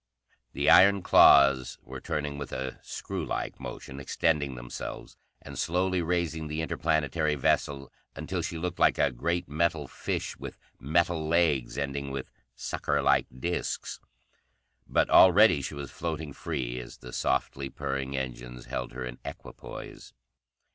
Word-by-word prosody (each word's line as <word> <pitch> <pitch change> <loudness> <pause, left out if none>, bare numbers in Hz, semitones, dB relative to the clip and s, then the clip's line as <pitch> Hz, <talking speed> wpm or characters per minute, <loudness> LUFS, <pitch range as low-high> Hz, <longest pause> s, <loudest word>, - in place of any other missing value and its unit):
The - - -1
iron 100 0 +7
claws 65 -2 +6
were - - -9
turning 75 -1 -3
with 70 - -6
a 65 0 -4
screwlike - - -4
motion, 65 +1 -8
extending 70 0 0
themselves, - - -7 0.3
and - - -8
slowly 90 +1 +1
raising 85 -2 -1
the 75 +1 -3
interplanetary 75 -1 0
vessel 70 0 0 0.2
until 85 +4 -3
she 80 0 -4
looked 90 +1 -4
like - - +4
a 70 - +3
great 85 +8 -2
metal 80 -1 0
fish - - -3
with - - -8 0.2
metal 80 +2 +1
legs 80 -7 +2
ending 70 0 -3
with 70 -1 -5 0.2
suckerlike 70 -1 +1
disks. 85 +5 -3 0.9
But - - +2
already 95 -3 +7
she 70 - -5
was 70 -1 -7
floating 80 -3 -4
free 60 -2 -3
as 65 +2 -10
the 60 0 -11
softly 65 +1 -1
purring 70 0 -3
engines 60 -1 -6
held - - -4
her 65 0 -5
in 60 0 -7
equipoise. - - -9
70 Hz, 135 wpm, -28 LUFS, 65-85 Hz, 0.9 s, iron